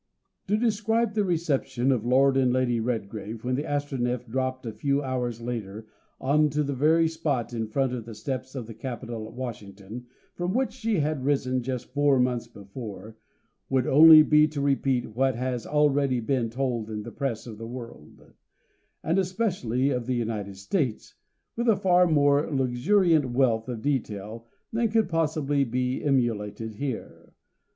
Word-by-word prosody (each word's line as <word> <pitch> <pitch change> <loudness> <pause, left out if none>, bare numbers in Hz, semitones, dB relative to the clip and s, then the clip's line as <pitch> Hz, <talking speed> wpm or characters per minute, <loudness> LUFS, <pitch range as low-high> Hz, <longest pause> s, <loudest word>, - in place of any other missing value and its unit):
To 210 +2 +2
describe 225 0 +1
the 210 -1 +1
reception 150 -7 0
of 120 -3 0
Lord 135 +2 +4
and 130 -2 +3
Lady 125 -2 +1
Redgrave 110 -1 -4
when 125 +1 -1
the 145 +4 -1
Astronef 130 -5 -2
dropped 130 +2 -2
a 115 - -4
few 140 +2 0
hours 125 -3 -3
later, 110 -3 -5 0.3
on 150 +3 +3
to 150 +1 0
the 140 0 -2
very 160 +5 +3
spot 150 -7 -2
in 115 -2 -2
front 130 +3 0
of 120 -3 -5
the 115 -2 -9
steps 130 +1 -5
of 125 -4 -4
the 115 - -9
Capitol 115 -1 -6
at - - -12
Washington 110 -2 -8 0.3
from 180 +3 -2
which 260 +1 0
she 230 -3 -1
had 150 -3 -1
risen 130 -2 +1
just 125 0 -5
four 145 -2 +3
months 125 -2 0
before, 110 0 -9 0.5
would 130 -1 +1
only 155 +2 +9
be 150 0 +5
to 150 -1 -5
repeat 135 -5 0
what 130 0 +2
has 125 0 -3
already 145 -3 +2
been 120 0 -1
told 120 -3 -2
in 105 -1 -4
the - - -8
Press 135 -6 -3
of 110 -3 -9
the 115 - -6
world, 115 -11 -11 0.7
and 170 +4 +1
especially 180 - 0
of 125 -2 -2
the 130 - 0
United 110 -4 -3
States, 120 - -2 0.4
with 235 +1 0
a 220 - +5
far 180 -1 +4
more 145 -2 +3
luxuriant 145 +4 +2
wealth 120 -2 +1
of 115 -3 -5
detail 115 -5 -3 0.3
than 230 0 +1
could 225 0 +2
possibly 155 -4 0
be 125 +1 -2
emulated 115 -5 -1
here. 130 +1 -6
130 Hz, 165 wpm, -26 LUFS, 115-150 Hz, 0.7 s, only